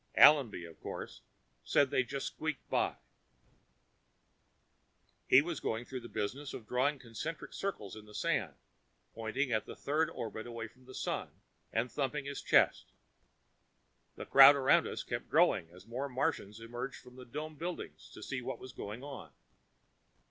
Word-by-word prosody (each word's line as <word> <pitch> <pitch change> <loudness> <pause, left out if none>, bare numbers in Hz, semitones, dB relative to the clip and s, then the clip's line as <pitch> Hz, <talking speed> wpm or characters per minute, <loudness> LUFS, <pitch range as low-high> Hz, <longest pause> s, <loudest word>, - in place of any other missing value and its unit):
Allenby, 130 - +7
of 85 -1 -13
course, - - -6 0.4
said 140 -2 +3
they - - +3
just 135 +2 -4
squeaked 155 -3 -4
by. - - +1 2.3
He 130 +3 +7
was 170 -2 -3
going 115 +2 -2
through 130 0 -5
the 120 -1 -10
business 135 +8 -3
of 110 - -9
drawing 135 +4 +1
concentric 130 +6 -6
circles 150 - -4
in 110 -1 -11
the 105 0 -14
sand, - - 0 0.6
pointing 115 +4 -1
at 110 -2 0
the - - -7
third 155 +3 0
orbit 110 -6 -5
away 115 -1 -5
from 125 +3 -22
the 130 - -11
Sun - - -2 0.4
and 115 +2 0
thumping 145 0 -2
his 140 0 -4
chest. - - +3 1.2
The - - -7
crowd 140 +1 +10
around 135 -1 +4
us - - -4
kept - - -4
growing 80 - +4
as 90 +2 -15
more 130 +5 -4
Martians 125 -6 -1
emerged 120 +3 -6
from 125 - -15
the 130 - -10
dome 155 +6 -6
buildings 170 +4 -6
to - - -9
see 130 -2 -3
what - - -4
was 130 -1 -10
going 110 +4 -6
on. 140 -1 -8
130 Hz, 160 wpm, -33 LUFS, 115-140 Hz, 2.3 s, crowd